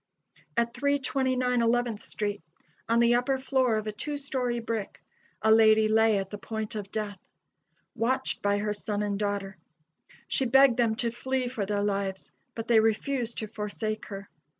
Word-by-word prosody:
At 235 0 +1
329 260 -2 +1
Eleventh 235 -2 +1
street, 205 -2 -3 0.5
on 230 +1 +4
the 235 0 +5
upper 250 +3 +2
floor 260 -3 +1
of 215 0 -2
a 215 - -2
two 290 +8 -4
story 260 -4 -1
brick, 225 -3 -4 0.4
a 220 - +5
lady 220 -1 +6
lay 220 -1 +4
at 195 -1 -3
the 205 - -6
point 220 +1 -4
of 205 -2 -6
death; 210 -3 -4 0.7
watched 250 +3 0
by 205 0 +2
her 210 0 -1
son 210 0 -3
and 205 -1 -2
daughter. 200 -2 -2 0.7
She 265 - +1
begged 265 0 +5
them 230 -3 +2
to 235 -1 -1
flee 260 +1 -2
for 225 -5 -3
their 205 0 0
lives, 195 -2 -2 0.2
but 225 0 -5
they 230 -2 +6
refused 230 +2 0
to 215 - -3
forsake 215 0 -4
her. 200 -1 -7
225 Hz, 170 wpm, -28 LUFS, 210-245 Hz, 0.7 s, lady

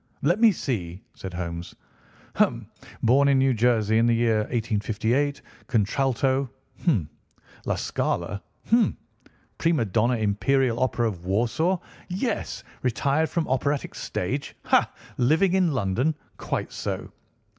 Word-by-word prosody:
"Let 175 +9 +2
me 230 -2 +8
see!" 100 - -4
said 95 - -7
Holmes. 85 -1 -5 0.6
"Hum! - - +1 0.4
Born 135 +5 +5
in 140 -1 +4
New 135 0 +3
Jersey 110 -2 +3
in 115 - +4
the 120 - +4
year 115 -1 +2
1858. 115 +4 0 0.2
Contralto—hum! 130 - 0 0.6
La - - +1
Scala, 95 +3 -2 0.3
hum! 235 0 +4 0.6
Prima 165 -8 +2
donna 115 +5 +2
Imperial 120 +4 +1
Opera 120 -2 +1
of 90 -5 -6
Warsaw—yes! 165 - -1 0.2
Retired 140 +6 +1
from 170 -2 -1
operatic 140 +2 0
stage—ha! - - -1 0.3
Living 160 +9 +3
in 185 -3 +3
London—quite 125 +6 -2
so! - - -4
125 Hz, 110 wpm, -25 LUFS, 110-145 Hz, 0.6 s, me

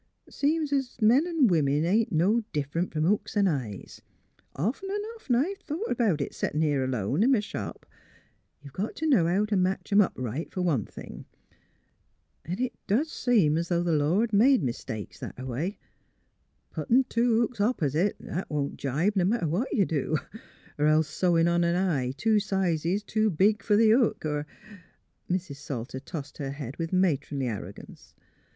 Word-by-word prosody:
Seems 300 0 0
's 270 -3 -1
'o' 215 - +2
men 265 +10 +5
an' 330 -6 +3
women 155 - +2
ain't 215 +6 +2
no 200 +8 +2
differ 150 +3 -1
'nt 180 - -2
from 155 -1 -1
hooks 205 +4 0
'n' 200 -1 +4
eyes; 125 - -4 0.5
often 235 - -2
an' 410 +1 -2
often 295 - -1
I've 365 +11 0
thought 380 +4 -4
about 215 - +1
it, - - -3
settin' 150 - -2
here 145 -3 +1
alone 130 - -1
in 260 +4 +5
m' - - +2
shop. 210 - -6 0.8
You 140 - -11
got 195 +10 -4
t' 320 - -3
know 240 - +4
how 190 +5 +2
t' 210 -1 -1
match 185 +2 -1
'em 205 +1 +6
up 195 - +1
right, 130 +5 -4
fer 185 - -3
one 145 - +1
thing, - - -10 0.6
— - - -44
'n' 180 +5 -3
it 255 0 -1
doos 265 +11 +1
seem 185 -11 +2
's 170 +1 -4
'o' 175 0 +2
th' 175 - -1
Lord 180 +10 +1
made 250 +6 +5
mis 120 -3 -3
takes 105 -4 -7
that - - -7
a 130 - -7
Avay; 140 - -3 0.9
puttin' 250 +3 +2
two 235 -2 +1
hooks 235 -2 -1
op 235 +5 +1
'site 155 +7 +1
'at 180 +4 -4
won't 145 -2 -2
gibe, 155 +10 0
n' 180 +1 +2
matter 220 -7 0
what 185 - -1
you 200 -6 +3
do; 155 0 -1 0.6
'r 150 - +3
else 155 0 +3
sewin' 165 +1 +2
on 170 0 +2
an 170 0 +1
eye 165 -9 0
two 215 +8 +3
sizes 190 -1 0
too 215 +1 +1
big 200 +4 +2
fer 205 0 +2
the 220 0 +5
hook, 235 -7 +2
er 150 -1 -2 0.4
" - - -40
■Mrs. 175 -6 -2
Salter 130 -2 -5
tossed 140 +1 -8
her 140 -2 -3
head, 140 -2 -7
\^ith 165 -1 -3
matronly 150 -7 0
arrogance. 110 -4 -8
180 Hz, 190 wpm, -27 LUFS, 150-225 Hz, 0.9 s, em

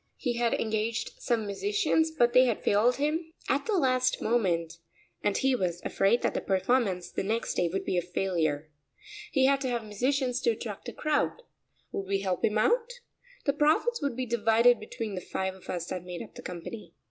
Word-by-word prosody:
He 240 -4 -2
had 235 -1 +2
engaged 220 +1 -2
some 230 -3 0
musicians 325 - +1
but 240 -7 +2
they 255 0 +7
had 235 -4 -1
failed 225 +5 +3
him 320 +3 -1
at 280 - 0
the 425 -3 +2
last 255 -4 +2
moment 170 -8 0 0.4
and 205 -1 +1
he 265 0 +2
was 180 -6 -1
afraid 200 +5 +2
that - - +1
the - - -2
performance 190 -1 +1
the - - -2
next 220 +4 -1
day 175 - +1
would 195 - -2
be 180 - +1
a - - -1
failure. 165 -4 -1 0.6
He 270 -2 +3
had 275 0 +3
to 260 - -1
have 240 -2 -1
musicians 250 +4 0
to - - +2
attract 220 -2 -4
a - - -9
crowd. 305 +10 0 0.5
Would 195 - -4
we 195 0 0
help 185 -3 -2
him 215 0 +2
out? 475 - +2 0.5
The 280 - +2
profits 310 - +2
would 280 -4 -1
be 255 +1 -2
divided 230 +1 +4
between 215 0 -5
the 185 - -4
five 190 +1 -3
of 190 - -16
us 175 -2 -2
that 185 - -3
made 180 -1 -6
up - - -14
the - - -10
company. 180 +5 -8
230 Hz, 200 wpm, -29 LUFS, 190-265 Hz, 0.6 s, they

